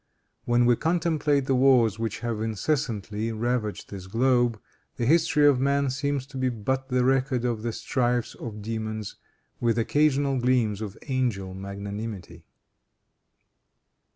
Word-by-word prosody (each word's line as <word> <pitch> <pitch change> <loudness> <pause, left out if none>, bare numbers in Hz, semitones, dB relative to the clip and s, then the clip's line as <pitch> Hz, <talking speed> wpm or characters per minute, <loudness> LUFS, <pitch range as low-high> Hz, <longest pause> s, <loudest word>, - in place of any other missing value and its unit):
When 120 0 +3
we 120 0 +5
contemplate 160 -4 +1
the 135 - +1
wars 125 -5 +4
which 115 -1 -3
have 115 -2 -2
incessantly 110 -2 -2
ravaged 115 -1 -2
this 95 -2 -7
globe, 120 +1 +2 0.4
the 120 - -2
history 155 +1 +4
of 140 -3 +5
man 140 0 +1
seems 140 0 -2
to 135 0 -10
be 130 0 +1
but 130 +3 -2
the 125 -1 +2
record 130 -1 +1
of 115 -3 -1
the 115 +1 -2
strifes 120 0 -1
of 105 -3 -8
demons, 110 -1 -4 0.4
with 115 -1 +1
occasional 140 +2 +2
gleams 120 -4 +1
of 105 -2 -6
angel 120 -9 -1
magnanimity. 100 -3 -7
120 Hz, 135 wpm, -26 LUFS, 110-135 Hz, 0.4 s, we